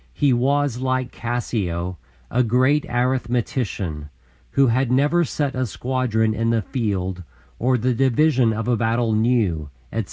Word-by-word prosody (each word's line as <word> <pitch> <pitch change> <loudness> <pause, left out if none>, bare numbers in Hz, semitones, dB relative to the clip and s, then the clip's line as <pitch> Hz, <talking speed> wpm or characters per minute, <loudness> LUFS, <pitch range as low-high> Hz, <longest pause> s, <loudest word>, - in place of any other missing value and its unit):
He 145 -3 +3
was, 135 +1 +1
like 130 -1 -1
Cassio, 95 -8 -3 0.3
"a 125 - +2
great 130 +5 +2
arithmetician, 120 - -1 0.4
who 140 - +4
had 125 +1 +1
never 145 +7 +3
set 145 -3 -2
a 130 -1 -1
squadron 110 -2 0
in 115 +1 0
the 115 -2 +1
field 95 -5 -2 0.4
or 125 +2 +2
the 125 +2 +1
division 130 0 +3
of 110 +1 -3
a 125 - +3
battle 115 0 +1
knew," 110 -10 +1 0.2
etc. - - -2
120 Hz, 140 wpm, -22 LUFS, 110-130 Hz, 0.4 s, who